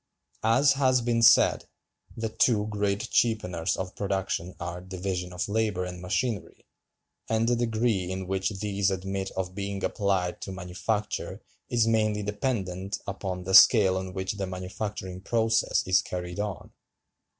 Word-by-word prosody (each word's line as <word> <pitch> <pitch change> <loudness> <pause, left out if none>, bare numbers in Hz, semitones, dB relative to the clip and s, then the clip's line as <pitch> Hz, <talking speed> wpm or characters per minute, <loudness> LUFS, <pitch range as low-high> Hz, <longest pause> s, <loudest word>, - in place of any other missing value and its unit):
As 130 +6 +4
has 130 -2 +3
been 115 -1 +1
said, 115 - +5 0.5
"the 110 0 -2
two 110 -1 +2
great 105 +1 -2
cheapeners 90 -7 +1
of 95 0 -5
production 95 -3 -2
are 90 +1 -5
division 90 -1 -4
of 90 0 -3
labor 105 -3 0
and 90 -1 -7
machinery, 105 +4 -2 0.6
and 110 +1 +1
the 120 - +3
degree 115 -5 0
in 95 0 -4
which 95 +1 -1
these 100 -1 -1
admit 95 0 -3
of 90 -1 -2
being 100 0 -4
applied 95 -3 0
to 95 - -5
manufacture 95 +4 -3 0.3
is 120 -2 +3
mainly 110 -2 +1
dependent 100 -3 -2
upon 95 -2 -4
the 95 +1 -3
scale 95 -2 +8
on 95 0 -3
which 95 +2 -3
the 95 -2 -2
manufacturing 95 0 -5
process 115 +1 +1
is 95 0 +4
carried 90 +1 -5
on. 100 -6 -4
100 Hz, 145 wpm, -27 LUFS, 95-110 Hz, 0.6 s, scale